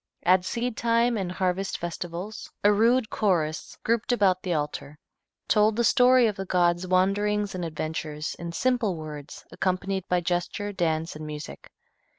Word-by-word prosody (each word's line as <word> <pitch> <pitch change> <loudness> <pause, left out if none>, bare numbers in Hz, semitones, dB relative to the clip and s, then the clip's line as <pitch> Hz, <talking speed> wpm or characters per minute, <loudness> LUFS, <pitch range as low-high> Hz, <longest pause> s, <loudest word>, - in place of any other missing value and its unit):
At 185 0 +4
seed 240 +3 -2
time 235 +1 +2
and 190 -4 -2
harvest 185 +1 -1
festivals 175 +4 -6
a 205 +1 +6
rude 230 +2 +3
chorus, 165 -7 0
grouped 230 +1 +1
about 195 -6 +3
the 185 - -3
altar, 150 -1 -3 0.5
told 210 0 +3
the 235 - +1
story 250 +1 +5
of 210 -3 0
the 195 - -4
god's 175 0 +1
wanderings 200 +2 +1
and 180 -1 -4
adventures, 155 -1 -4
in 170 -1 -5
simple 235 0 +1
words, 150 -3 -8
accompanied 190 0 -2
by 180 - +2
gesture, 175 +4 -2
dance 165 -3 -1
and 155 0 -7
music. 150 -1 -8
185 Hz, 155 wpm, -26 LUFS, 170-215 Hz, 0.5 s, a